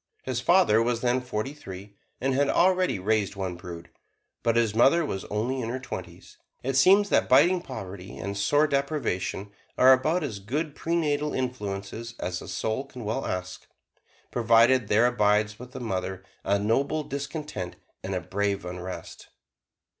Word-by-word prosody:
His 125 -1 -2
father 170 - +4
was 120 0 0
then 125 +1 +1
forty 125 +2 -3
three, 100 -7 -10 0.2
and 135 +1 0
had 140 +2 +2
already 185 - +3
raised 105 +1 0
one 95 -2 -3
brood, 85 -1 -9 0.5
but 115 -1 +1
his 115 -3 +2
mother 140 +9 +4
was 95 -9 -4
only 120 +5 -2
in 115 - -3
her 125 - -2
twenties. 130 0 -9 0.2
It 135 +1 -1
seems 195 +9 +6
that - - +2
biting 170 +8 +5
poverty 100 - -8
and 100 0 -4
sore 145 +10 +3
deprivation 140 - -2 0.3
are 130 +1 +8
about 155 +7 +1
as 110 -9 -4
good 145 +10 -3
prenatal 150 -3 -1
influences 115 -2 -4
as 90 0 -3
a - - -9
soul 110 +5 -2
can 125 -4 -9
well 115 +6 -2
ask, 90 0 -5 0.6
provided 115 0 +4
there 110 +4 +4
abides 105 -3 +2
with 125 +1 -10
the 130 - -7
mother 95 -4 -3 0.2
a 100 +1 +2
noble 135 +9 0
discontent 140 - -5 0.3
and 95 0 -3
a 90 - -1
brave 100 +2 -2
unrest. 90 +1 -7
120 Hz, 160 wpm, -27 LUFS, 100-140 Hz, 0.6 s, are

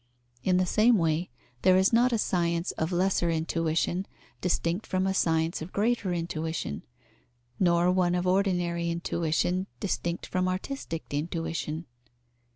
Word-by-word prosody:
In 180 -1 +3
the 185 - +3
same 220 +5 +4
way, 165 -1 0 0.3
there 185 -1 +5
is 190 +4 +3
not 245 +2 +4
a 230 - +2
science 170 -4 0
of 160 +2 -2
lesser 180 -1 +1
intuition 165 +3 0 0.3
distinct 175 +2 0
from 185 0 0
a 190 - +1
science 165 -2 +1
of 160 +4 -7
greater 210 -2 0
intuition, 165 - -3 0.8
nor 175 0 +4
one 180 -1 +2
of 180 0 -1
ordinary 175 -3 +1
intuition 170 +2 0
distinct 175 -3 -2
from 185 0 -1
artistic 185 - -4
intuition. 165 +1 -3
175 Hz, 135 wpm, -28 LUFS, 165-185 Hz, 0.8 s, there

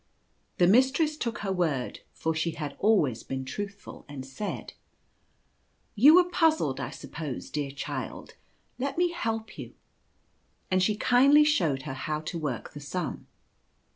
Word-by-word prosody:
The 175 - +5
mistress 265 - +4
took 235 -5 -3
her 195 - 0
word 160 -9 -1
— - - -42
for 160 - -1
she 160 +1 -1
had 150 -3 -5
always 175 - +3
been 130 0 -5
truthful 200 +9 -7
— - - -31
and 135 -2 -7
said: 135 +11 -5 0.6
" - - -43
You 280 +9 +8
were 360 - +8
puzzled, 320 - +1
I 125 -2 -3
suppose, 150 -1 -7
dear 145 -2 -2
child; 140 +1 -6 0.5
let 275 +4 -2
me 350 0 +2
help 225 -10 -4
you," - - -8 1.0
and 185 0 +3
she 210 +3 +2
kindly 275 +6 +6
showed 165 - +1
her 145 - -5
how 150 +3 -3
to 160 +2 -5
work 140 -7 -4
the 145 - -8
sum. 145 +1 -4
180 Hz, 160 wpm, -28 LUFS, -, 1.0 s, You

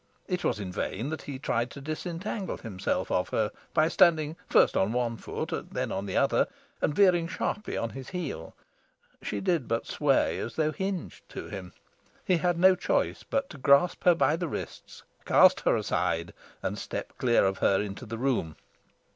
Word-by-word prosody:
It 180 -2 -2
was - - 0
in 95 -3 -5
vain 110 +7 -3
that 160 - -4
he 140 -2 -6
tried 120 -2 -1
to 140 - -10
disentangle 170 +6 -4
himself 100 -5 -3
of 90 - +1
her 110 -1 0 0.2
by 155 -1 +3
standing 160 -2 +4
first - - +5
on 100 +4 +2
one 120 -1 0
foot, - - -5 0.2
then - - -2
on 100 - -3
the 95 - -1
other, - - +3 0.3
and 145 - +1
veering 180 -4 +4
sharply 205 +2 -3
on 115 - -2
his 135 -1 -8
heel: 170 - -5 0.7
she - - -3
did 175 -9 0
but 115 0 -1
sway 145 -3 +1
as 115 - -5
though 155 -1 +1
hinged 190 0 -5
to - - -7
him. 95 -3 -7 0.5
He 185 - +3
had 175 +1 +1
no 185 +2 +7
choice 180 - 0
but 275 0 -1
to 155 - -10
grasp 140 +6 +4
her 175 -1 +7
by 160 -1 +3
the 175 0 -2
wrists, - - -7 0.2
cast - - +6
her - - +2
aside, 85 +1 -1 0.3
and - - -2
step - - -5
clear 120 -5 +4
of 95 0 0
her 95 - +3
into 105 +4 -5
the 115 +1 -5
room. 120 - 0
140 Hz, 185 wpm, -28 LUFS, 110-175 Hz, 0.7 s, no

